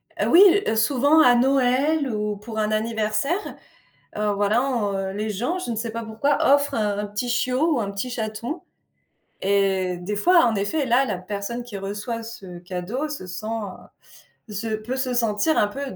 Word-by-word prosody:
Heu, -, -, 0 dB
oui, 345 Hz, -, +7 dB, 0.4 s
souvent 285 Hz, +6 st, +4 dB
à 245 Hz, -5 st, +6 dB
Noël 270 Hz, +4 st, +2 dB
ou 210 Hz, -1 st, -2 dB
pour 220 Hz, +2 st, -6 dB
un 215 Hz, 0 st, 0 dB
anniversaire, 220 Hz, -, -1 dB, 0.6 s
heu, 210 Hz, -1 st, +1 dB
voilà, 205 Hz, +3 st, +2 dB
on 200 Hz, -7 st, -1 dB
les 210 Hz, +2 st, -3 dB
gens, 245 Hz, -, -2 dB
je 360 Hz, -, -4 dB
ne -, -, -2 dB
sais 230 Hz, +1 st, -3 dB
pas 230 Hz, +1 st, -5 dB
pourquoi, 225 Hz, +7 st, 0 dB, 0.2 s
offrent 285 Hz, 0 st, +2 dB
un 210 Hz, -2 st, -1 dB
petit 210 Hz, +4 st, -3 dB
chiot 255 Hz, +6 st, +1 dB
ou -, -, 0 dB
un 200 Hz, -, -3 dB
petit 200 Hz, +6 st, -4 dB
chaton, 235 Hz, +7 st, -4 dB, 0.8 s
et 190 Hz, -2 st, +1 dB
des 180 Hz, +4 st, -4 dB
fois, 345 Hz, -, +5 dB
en 230 Hz, -, +1 dB
effet, 205 Hz, +10 st, 0 dB
là, 250 Hz, +2 st, +3 dB
la 210 Hz, -6 st, -2 dB
personne 200 Hz, +6 st, -5 dB
qui 210 Hz, -5 st, -7 dB
reçoit 205 Hz, +4 st, -4 dB
ce 195 Hz, -6 st, -9 dB
cadeau 185 Hz, -, -4 dB
se 290 Hz, -11 st, -6 dB
sent, 185 Hz, +4 st, -6 dB, 1.0 s
heu, -, -, -7 dB
se 220 Hz, +3 st, -3 dB
peut 225 Hz, +4 st, -5 dB
se 260 Hz, -1 st, -1 dB
sentir 230 Hz, +6 st, +1 dB
un 210 Hz, -, +3 dB
peu 275 Hz, +7 st, -6 dB
225 Hz, 180 wpm, -23 LUFS, 205-260 Hz, 1.0 s, oui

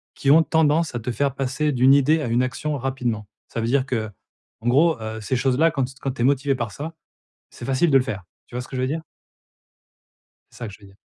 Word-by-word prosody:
qui 135 Hz, -, +2 dB
ont 160 Hz, +2 st, +7 dB
tendance 160 Hz, 0 st, +2 dB
à -, -, -1 dB
te 115 Hz, +2 st, -3 dB
faire 140 Hz, +2 st, 0 dB
passer 135 Hz, +3 st, 0 dB
d'une 130 Hz, 0 st, +5 dB
idée 150 Hz, +3 st, +4 dB
à 145 Hz, -, -2 dB
une 120 Hz, +2 st, +2 dB
action 145 Hz, +3 st, -2 dB
rapidement. 125 Hz, -5 st, -2 dB, 0.2 s
Ça -, -, -5 dB
veut 115 Hz, -, -1 dB
dire 130 Hz, +2 st, +2 dB
qu'en 110 Hz, -1 st, -7 dB
gros, 145 Hz, +3 st, +4 dB
heu, 110 Hz, 0 st, -5 dB
ces 105 Hz, +5 st, -1 dB
choses-là 135 Hz, +6 st, +3 dB
quand 135 Hz, -4 st, 0 dB
t 130 Hz, -, -10 dB
quand 135 Hz, -, -1 dB
tu 125 Hz, -, -6 dB
es -, -, +3 dB
motivé 135 Hz, 0 st, +2 dB
par 120 Hz, -4 st, -3 dB
ça, 155 Hz, +8 st, -6 dB, 0.6 s
c'est -, -, -10 dB
facile 135 Hz, +5 st, +2 dB
de 135 Hz, -, +6 dB
le 130 Hz, -, 0 dB
faire. 100 Hz, -8 st, -5 dB, 0.2 s
Tu -, -, -16 dB
vois 125 Hz, -, -2 dB
ce -, -, -12 dB
que 130 Hz, -, -6 dB
je 125 Hz, -, -1 dB
veux 130 Hz, -, +1 dB
dire? 160 Hz, +3 st, -2 dB, 1.5 s
C'est -, -, -16 dB
ça -, -, -3 dB
que -, -, -10 dB
je -, -, -16 dB
veux 100 Hz, -, -15 dB
dire. 95 Hz, 0 st, -19 dB
130 Hz, 255 wpm, -23 LUFS, 120-145 Hz, 1.5 s, ont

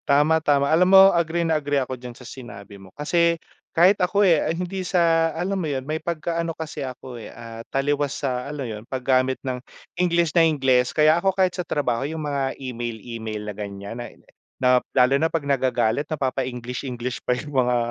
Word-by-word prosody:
Tama, 150 Hz, +3 st, +4 dB
tama, 145 Hz, -2 st, +2 dB
alam 180 Hz, +3 st, +4 dB
mo 195 Hz, 0 st, +8 dB
agree 170 Hz, 0 st, 0 dB
na 160 Hz, -2 st, +1 dB
agree 145 Hz, 0 st, 0 dB
ako 130 Hz, -1 st, -1 dB
diyan 125 Hz, -1 st, -9 dB
sa 125 Hz, -, -13 dB
sinabi 100 Hz, -6 st, -10 dB
mo 95 Hz, -, -14 dB
kasi 170 Hz, +3 st, +2 dB, 0.3 s
kahit 180 Hz, +5 st, +5 dB
ako, 200 Hz, +3 st, +3 dB
eh, 165 Hz, -4 st, +3 dB
hindi 180 Hz, +3 st, -3 dB
sa 165 Hz, -2 st, +2 dB
alam 175 Hz, +5 st, -2 dB
mo -, -, -3 dB
'yon 130 Hz, -2 st, -3 dB
may 155 Hz, +1 st, -2 dB
pagka-ano 170 Hz, 0 st, -2 dB
kasi 155 Hz, -2 st, -6 dB
ako, 130 Hz, -1 st, -8 dB
eh, -, -, -9 dB
ah, 115 Hz, -1 st, -9 dB
taliwas 145 Hz, +1 st, 0 dB
sa 125 Hz, 0 st, -2 dB
ano 145 Hz, -3 st, -5 dB
'yon 105 Hz, -1 st, -6 dB
paggamit 130 Hz, 0 st, +1 dB
ng 125 Hz, -1 st, -3 dB, 0.3 s
Ingles 170 Hz, -2 st, +1 dB
na 170 Hz, -, +6 dB
Ingles. 130 Hz, -6 st, +2 dB
Kaya 155 Hz, 0 st, +4 dB
ako 195 Hz, -, +4 dB
kahit 185 Hz, -1 st, +1 dB
sa 180 Hz, -, -2 dB
trabaho 135 Hz, -7 st, -1 dB
yung 160 Hz, +3 st, -4 dB
mga 140 Hz, -2 st, -2 dB
email-email 115 Hz, -4 st, -5 dB
na 105 Hz, -, -4 dB
gan'yan. 100 Hz, +1 st, -7 dB
na 120 Hz, 0 st, -6 dB, 0.5 s
na 125 Hz, -, +3 dB, 0.2 s
lalo 130 Hz, +1 st, +4 dB
na 160 Hz, -, +1 dB
pag 160 Hz, -3 st, -2 dB
nagagalit 130 Hz, -2 st, +1 dB
napapa-English-English 125 Hz, -2 st, -3 dB
pa -, -, -1 dB
yung 145 Hz, +2 st, -8 dB
mga, 125 Hz, 0 st, +1 dB
140 Hz, 190 wpm, -23 LUFS, 125-165 Hz, 0.5 s, mo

